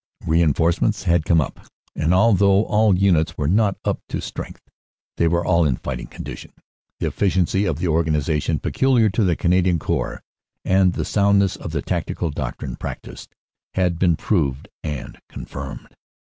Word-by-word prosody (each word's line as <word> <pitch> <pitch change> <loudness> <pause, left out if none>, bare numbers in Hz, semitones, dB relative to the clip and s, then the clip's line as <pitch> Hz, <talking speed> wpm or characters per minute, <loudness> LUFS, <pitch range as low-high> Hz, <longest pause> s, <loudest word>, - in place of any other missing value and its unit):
"Reinforcements 85 +6 +2
had 85 -3 +2
come 85 -2 +4
up, 75 - -3 0.4
and 80 +3 0
although 100 0 +4
all 105 -3 +3
units 85 -4 +2
were 75 - -1
not 100 +3 +2
up - - 0
to - - -3
strength, - - -8 0.5
they 85 - +3
were 85 +1 +1
all 85 -2 +3
in 70 -5 +2
fighting 65 0 -5
condition. - - -9 0.5
The - - -1
efficiency 95 0 +1
of 80 -6 -1
the 90 - -2
organization 80 -1 +1
peculiar 120 - +2
to 105 +3 +1
the 90 -3 +2
Canadian 90 +1 +2
Corps, - - -3 0.4
and 95 -1 +3
the - - -3
soundness 100 -2 +2
of - - -7
the 75 -3 -2
tactical 85 -3 -2
doctrine 65 -4 -5
practised, - - -8 0.4
had 90 -3 +1
been 85 -3 +3
proved 75 -8 -1
and 75 -4 -6
confirmed. - - -8
85 Hz, 155 wpm, -21 LUFS, 80-95 Hz, 0.5 s, come